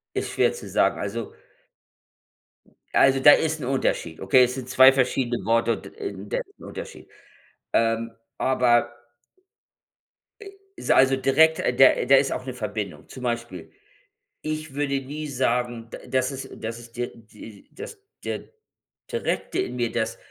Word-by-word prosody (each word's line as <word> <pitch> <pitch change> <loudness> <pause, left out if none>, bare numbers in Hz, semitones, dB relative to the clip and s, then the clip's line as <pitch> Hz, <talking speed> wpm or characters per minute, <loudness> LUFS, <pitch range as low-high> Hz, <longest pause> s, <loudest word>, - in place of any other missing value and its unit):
Ist - - -2
schwer - - +2
zu - - -9
sagen. - - +1
Also 105 +3 -4 1.7
also, 135 0 +5
da 140 +2 +9
ist 160 -1 0
'n - - -4
Unterschied, 125 -10 -1
okay? 110 +7 +5
Es 125 0 0
sind 130 -2 -6
2 130 +1 +8
verschiedene 130 -2 0
Worte 115 +1 +2
und, - - -8
äh, 405 -3 -3
und - - -9
das - - 0
ist 400 - -28
'n - - -14
Unterschied. - - -9 0.6
Ähm, 115 0 +1 0.3
aber 120 -2 +2 1.5
äh, 410 - -10 0.3
ist - - -2
also, 135 0 +5
direkt 155 +5 +4
der 130 +1 +4
da 135 +2 +6
ist 135 0 +3
auch 125 - -4
'ne 130 - -5
Verbindung. 105 -8 -5
Zum 130 - -10
Beispiel, 120 -8 -4 0.7
ich 155 -2 -5
würde 140 -1 -1
nie 150 +3 -6
sagen, 120 -3 -1
d - - -8
das 130 0 +1
ist 135 0 -7
das 115 +1 -5
ist 115 0 -14
der 120 0 -2
die 110 -2 -14
das 445 - -9 0.3
der - - -4 0.7
Direkte 470 - -2
in 125 - -2
mir, 120 -2 -1
das 115 -1 -2
125 Hz, 160 wpm, -24 LUFS, 115-135 Hz, 1.7 s, da